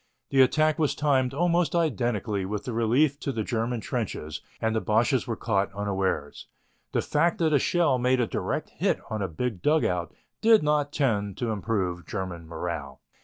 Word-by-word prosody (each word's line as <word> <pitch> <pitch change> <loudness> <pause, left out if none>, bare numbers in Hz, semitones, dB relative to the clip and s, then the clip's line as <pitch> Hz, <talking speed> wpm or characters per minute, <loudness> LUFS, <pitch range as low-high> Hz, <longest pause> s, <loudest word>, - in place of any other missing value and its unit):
The 135 - +5
attack 155 +4 +3
was 150 -3 +1
timed 135 -4 +2
almost 170 +1 +1
identically 120 - 0
with 105 +2 -3
the 125 - -3
relief 125 +6 +2
in 135 - -1
the 110 - -1
German 115 +1 -2
trenches 105 - -4 0.2
and 110 0 0
the 110 - +1
Boches 120 +5 +2
were 115 - -1
caught 100 -4 0
unawares. 95 -7 -2 0.4
The - - 0
fact 165 +3 +1
that 160 -2 +2
a 145 - +5
shell 155 -4 +2
made 125 +1 +2
a 120 - +3
direct - - -3
hit - - 0
on 110 -1 -2
a 95 - 0
big 100 +3 -3
dugout 90 - +1 0.3
did 225 -5 +6
not 150 -1 +1
tend 105 - 0
to 120 -2 -1
improve 95 -5 -2
German 90 -5 -5
morale. 80 -5 -5
120 Hz, 175 wpm, -27 LUFS, 100-145 Hz, 0.4 s, did